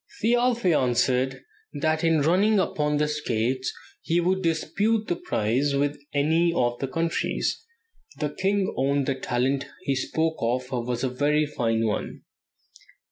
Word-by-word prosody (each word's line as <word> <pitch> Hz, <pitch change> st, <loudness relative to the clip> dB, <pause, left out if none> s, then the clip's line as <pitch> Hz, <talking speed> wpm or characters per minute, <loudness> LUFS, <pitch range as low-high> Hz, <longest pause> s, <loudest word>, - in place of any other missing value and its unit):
Thialfe 240 Hz, +1 st, +2 dB
answered 130 Hz, -3 st, +2 dB, 0.4 s
that 155 Hz, +2 st, +1 dB
in 165 Hz, -2 st, +3 dB
running 190 Hz, +8 st, +3 dB
upon 150 Hz, -5 st, 0 dB
skates 130 Hz, -3 st, -1 dB, 0.3 s
he 170 Hz, +1 st, +1 dB
would 185 Hz, +2 st, +1 dB
dispute 200 Hz, +7 st, 0 dB
the 175 Hz, -, 0 dB
prize 130 Hz, +6 st, 0 dB
with 145 Hz, +1 st, 0 dB
any 160 Hz, +4 st, +2 dB
of 120 Hz, -7 st, 0 dB
the 135 Hz, -, -2 dB
countries. 165 Hz, +5 st, -1 dB, 0.5 s
The 150 Hz, -, -2 dB
king 195 Hz, +3 st, 0 dB
owned 140 Hz, +1 st, +1 dB
that 135 Hz, -1 st, -2 dB
the -, -, -7 dB
talent 130 Hz, +3 st, 0 dB, 0.2 s
he 135 Hz, -, 0 dB
spoke 160 Hz, +4 st, -1 dB
of 125 Hz, +2 st, -1 dB
was 120 Hz, 0 st, -2 dB
a 130 Hz, -, +1 dB
very 145 Hz, +4 st, +1 dB
fine 115 Hz, -6 st, 0 dB
one." 105 Hz, -, -3 dB
145 Hz, 140 wpm, -25 LUFS, 130-165 Hz, 0.5 s, in